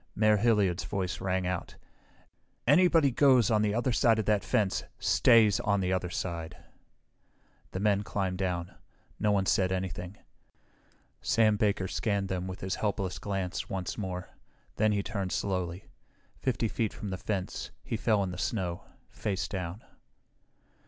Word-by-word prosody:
Mayor 110 Hz, 0 st, +4 dB
Hilliard's 105 Hz, -5 st, +2 dB
voice 95 Hz, -4 st, -3 dB
rang 95 Hz, -1 st, 0 dB
out, 90 Hz, -1 st, -3 dB, 0.9 s
"Anybody 165 Hz, +1 st, +5 dB
who -, -, -6 dB
goes 130 Hz, -5 st, +5 dB
on 105 Hz, -1 st, +3 dB
the 105 Hz, 0 st, +1 dB
other 120 Hz, +2 st, +1 dB
side 115 Hz, -1 st, +4 dB
of 110 Hz, -, -1 dB
that 105 Hz, -2 st, +2 dB
fence 100 Hz, -3 st, +1 dB
stays 110 Hz, -4 st, +5 dB
on 100 Hz, 0 st, +1 dB
the 95 Hz, 0 st, 0 dB
other 90 Hz, -1 st, -1 dB
side!" 85 Hz, -2 st, -4 dB, 1.1 s
The 95 Hz, -, -4 dB
men 100 Hz, 0 st, +2 dB
climbed 95 Hz, -3 st, -2 dB
down. 90 Hz, -2 st, -2 dB, 0.5 s
No 105 Hz, -, +2 dB
one 100 Hz, -2 st, +2 dB
said 95 Hz, -1 st, +2 dB
anything. 95 Hz, +1 st, -4 dB, 1.0 s
Sam 110 Hz, -2 st, +3 dB
Baker 100 Hz, -2 st, +1 dB
scanned 100 Hz, -1 st, -1 dB
them 95 Hz, 0 st, -2 dB
with 95 Hz, 0 st, -7 dB
his 95 Hz, 0 st, -2 dB
helpless 100 Hz, -3 st, -1 dB
glance 95 Hz, -3 st, -3 dB
once 95 Hz, -3 st, -3 dB
more. 95 Hz, -3 st, -5 dB, 0.5 s
Then 110 Hz, 0 st, +3 dB
he 100 Hz, -1 st, 0 dB
turned 95 Hz, -3 st, -3 dB
slowly. 90 Hz, -2 st, -2 dB, 0.5 s
Fifty 125 Hz, -3 st, 0 dB
feet 110 Hz, 0 st, -1 dB
from 100 Hz, -, -5 dB
the 95 Hz, -, -3 dB
fence 95 Hz, -1 st, -3 dB
he -, -, -3 dB
fell 110 Hz, -2 st, +2 dB
in 95 Hz, -, -3 dB
the 90 Hz, -, -7 dB
snow, 90 Hz, -5 st, -2 dB, 0.3 s
face 100 Hz, -2 st, -2 dB
down. 95 Hz, 0 st, -5 dB
100 Hz, 155 wpm, -29 LUFS, 95-110 Hz, 1.1 s, Anybody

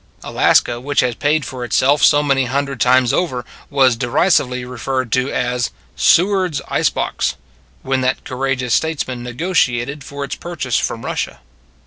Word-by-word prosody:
Alaska, 120 Hz, -, +2 dB
which 140 Hz, +3 st, +1 dB
has 125 Hz, -1 st, 0 dB
paid 145 Hz, +4 st, 0 dB
for 130 Hz, -1 st, -6 dB
itself 135 Hz, +4 st, +2 dB
so 145 Hz, 0 st, +5 dB
many 135 Hz, -2 st, +2 dB
hundred 140 Hz, 0 st, -2 dB
times 125 Hz, -1 st, +4 dB
over, 130 Hz, -9 st, -1 dB, 0.2 s
was 135 Hz, -4 st, +3 dB
derisively 125 Hz, 0 st, +1 dB
referred 125 Hz, 0 st, -3 dB
to 130 Hz, +3 st, +1 dB
as 125 Hz, -2 st, -1 dB, 0.2 s
" -, -, -35 dB
Seward 185 Hz, -2 st, +3 dB
s -, -, -1 dB
Ice -, -, +2 dB
Box -, -, -2 dB, 0.2 s
" -, -, -34 dB
when 130 Hz, 0 st, 0 dB
that 130 Hz, 0 st, 0 dB
courageous 130 Hz, -2 st, -2 dB
statesman 145 Hz, -6 st, -1 dB
negotiated 130 Hz, -1 st, -1 dB
for 140 Hz, +1 st, -6 dB
its 140 Hz, -, -5 dB
purchase 165 Hz, -8 st, -3 dB
from 115 Hz, -, -3 dB
Russia. 65 Hz, -, -3 dB
130 Hz, 160 wpm, -18 LUFS, 125-145 Hz, 0.2 s, so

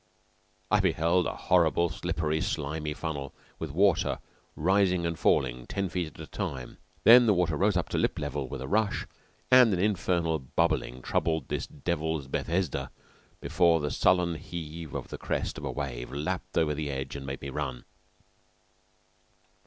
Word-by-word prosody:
I 105 Hz, -, +5 dB
beheld 90 Hz, -1 st, +2 dB
a -, -, -3 dB
horrible, 85 Hz, -1 st, +3 dB
slippery, 80 Hz, 0 st, -1 dB
slimy 75 Hz, 0 st, -2 dB
funnel 75 Hz, -5 st, -5 dB, 0.2 s
with 80 Hz, -, -4 dB
water 90 Hz, +4 st, +2 dB, 0.4 s
rising 90 Hz, +1 st, +2 dB
and 85 Hz, -, 0 dB
falling 60 Hz, -2 st, +1 dB
ten 100 Hz, -2 st, -2 dB
feet 90 Hz, -1 st, -2 dB
at -, -, -15 dB
a -, -, -6 dB
time. 65 Hz, -2 st, -5 dB, 0.2 s
Then 120 Hz, +1 st, +9 dB
the 105 Hz, -, +5 dB
water 85 Hz, -3 st, +1 dB
rose 100 Hz, +5 st, +2 dB
to 90 Hz, -, -1 dB
lip -, -, 0 dB
level 70 Hz, -1 st, -3 dB
with -, -, -5 dB
a -, -, -5 dB
rush, 105 Hz, +4 st, +1 dB, 0.5 s
and 125 Hz, -3 st, +8 dB
an 90 Hz, -, 0 dB
infernal 85 Hz, -4 st, +1 dB
bubbling 65 Hz, -3 st, -1 dB
troubled 80 Hz, -4 st, 0 dB
this -, -, -2 dB
Devil's 80 Hz, -1 st, -2 dB
Bethesda 85 Hz, +3 st, -1 dB, 0.5 s
before 85 Hz, -1 st, +3 dB
the 75 Hz, -1 st, -2 dB
sullen 90 Hz, -2 st, +3 dB
heave 80 Hz, -1 st, -7 dB
of -, -, -5 dB
the -, -, -7 dB
crest -, -, -2 dB
of -, -, -6 dB
a -, -, -2 dB
wave 60 Hz, -4 st, -5 dB
lapped 75 Hz, +7 st, -3 dB
over 75 Hz, -2 st, +3 dB
the 75 Hz, 0 st, -3 dB
edge 65 Hz, 0 st, -4 dB
and 70 Hz, -1 st, -6 dB
made 70 Hz, 0 st, -5 dB
me 70 Hz, -, -5 dB
run. 65 Hz, -1 st, -4 dB
80 Hz, 160 wpm, -28 LUFS, 70-90 Hz, 0.5 s, Then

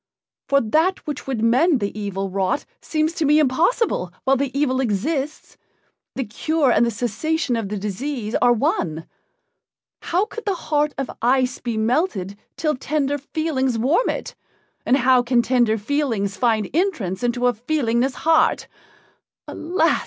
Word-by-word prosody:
For 275 Hz, 0 st, +4 dB
that 320 Hz, -, +1 dB
which 295 Hz, -3 st, -5 dB
would 245 Hz, -5 st, -2 dB
mend 260 Hz, +6 st, +4 dB
the 200 Hz, 0 st, -3 dB
evil 195 Hz, -2 st, -3 dB
wrought 195 Hz, +7 st, -1 dB, 0.2 s
seems 310 Hz, +1 st, -1 dB
to 325 Hz, -, -2 dB
me 300 Hz, +1 st, +4 dB
impossible 310 Hz, -, +1 dB
while 270 Hz, 0 st, +3 dB
the 275 Hz, +1 st, -1 dB
evil 260 Hz, -3 st, +1 dB
exists 270 Hz, +7 st, -2 dB, 0.6 s
the 265 Hz, -, -1 dB
cure 285 Hz, +5 st, 0 dB
and -, -, +4 dB
the 235 Hz, -, +2 dB
cessation 245 Hz, +6 st, -1 dB
of 225 Hz, -4 st, -3 dB
the 210 Hz, -, -3 dB
disease 215 Hz, +3 st, -4 dB
are 245 Hz, -, +5 dB
one. 165 Hz, -8 st, 0 dB, 1.0 s
How 365 Hz, +5 st, 0 dB
could 460 Hz, +1 st, -9 dB
the 400 Hz, -2 st, 0 dB
heart 300 Hz, -3 st, -1 dB
of 270 Hz, -1 st, -3 dB
ice 255 Hz, +1 st, +2 dB
be 235 Hz, -3 st, -3 dB
melted 220 Hz, -, 0 dB, 0.2 s
till 305 Hz, -2 st, +1 dB
tender 285 Hz, +1 st, -1 dB
feelings 270 Hz, -4 st, -1 dB
warm 280 Hz, -, +2 dB
it, -, -, -4 dB, 0.5 s
and 260 Hz, -, +4 dB
how 255 Hz, -1 st, +4 dB
can 240 Hz, -1 st, +2 dB
tender 240 Hz, -2 st, +2 dB
feelings 225 Hz, -5 st, -1 dB
find 220 Hz, -5 st, +1 dB
entrance 280 Hz, -, -1 dB
into 245 Hz, 0 st, 0 dB
a 245 Hz, -, +4 dB
feelingless 245 Hz, +1 st, 0 dB
heart? 325 Hz, -1 st, +3 dB, 0.8 s
Alas! 330 Hz, 0 st, +1 dB
255 Hz, 150 wpm, -22 LUFS, 225-305 Hz, 1.0 s, are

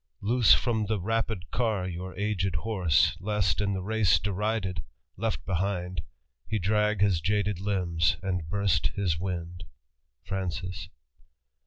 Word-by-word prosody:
Loose 115 Hz, +2 st, +5 dB
from 110 Hz, -4 st, 0 dB
the 110 Hz, -1 st, 0 dB
rapid 110 Hz, -2 st, -2 dB
car 110 Hz, -6 st, 0 dB
your 90 Hz, +1 st, -6 dB
aged 95 Hz, -3 st, 0 dB
horse, 90 Hz, -3 st, +2 dB
Lest, 100 Hz, -3 st, 0 dB
in 100 Hz, -1 st, +1 dB
the 95 Hz, -1 st, -3 dB
race 110 Hz, -1 st, +3 dB
derided, 100 Hz, -3 st, -1 dB, 0.3 s
left 110 Hz, +3 st, -2 dB
behind. 90 Hz, -2 st, -1 dB, 0.5 s
He 110 Hz, -, 0 dB
drag 105 Hz, +1 st, +1 dB
his 95 Hz, -5 st, +3 dB
jaded 100 Hz, +1 st, 0 dB
limbs 90 Hz, -5 st, +1 dB
and 90 Hz, -4 st, -2 dB
burst 100 Hz, -3 st, +2 dB
his 90 Hz, -6 st, 0 dB
wind." 90 Hz, -1 st, -4 dB, 0.6 s
FsANClS. 90 Hz, -2 st, -3 dB
95 Hz, 130 wpm, -28 LUFS, 90-105 Hz, 0.6 s, Loose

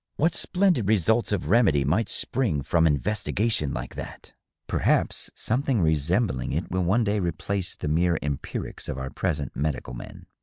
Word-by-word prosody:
What 165 Hz, +3 st, +2 dB
splendid 180 Hz, -, +1 dB
results 110 Hz, +3 st, +2 dB
of 95 Hz, -7 st, -1 dB
remedy 90 Hz, -, +4 dB
might 95 Hz, -, +1 dB
spring 100 Hz, -, -1 dB
from 80 Hz, +3 st, +3 dB
investigation 95 Hz, +1 st, 0 dB
like -, -, -5 dB
that! -, -, -9 dB, 0.3 s
Perhaps -, -, +1 dB
some 120 Hz, +4 st, 0 dB
thing 135 Hz, -5 st, +1 dB
resembling 80 Hz, -, +1 dB
it -, -, -3 dB
will 90 Hz, 0 st, 0 dB
one 100 Hz, +7 st, +2 dB
day 105 Hz, 0 st, +1 dB
replace 90 Hz, +2 st, -2 dB
the -, -, -5 dB
mere 85 Hz, +2 st, +2 dB
empirics 70 Hz, -2 st, -4 dB
of -, -, -3 dB
our 65 Hz, 0 st, -5 dB
present 75 Hz, -3 st, -2 dB
medical 70 Hz, -2 st, -2 dB
men. -, -, -9 dB
90 Hz, 160 wpm, -26 LUFS, 75-110 Hz, 0.3 s, remedy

